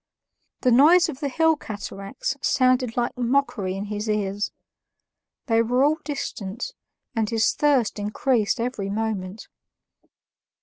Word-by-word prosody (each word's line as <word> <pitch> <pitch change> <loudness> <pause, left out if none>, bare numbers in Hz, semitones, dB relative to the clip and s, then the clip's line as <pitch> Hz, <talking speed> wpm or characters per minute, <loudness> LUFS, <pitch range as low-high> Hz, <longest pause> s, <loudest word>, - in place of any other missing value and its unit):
The 250 - +3
noise 315 +8 +6
of 260 - -6
the 285 -2 -2
hill 320 +4 +3
cataracts 200 -3 -5
sounded 255 -3 +2
like 240 0 0
mockery 245 -6 0
in 200 - -4
his 210 +1 -4
ears; 205 -1 -1 0.9
they 230 -2 +3
were 245 +3 +2
all 305 +3 +2
distant, 235 - -5 0.4
and 220 -2 0
his 225 -1 +2
thirst 270 -8 +2
increased 215 +1 0
every 230 -5 -2
moment. 205 -2 -3
230 Hz, 125 wpm, -24 LUFS, 205-265 Hz, 0.9 s, noise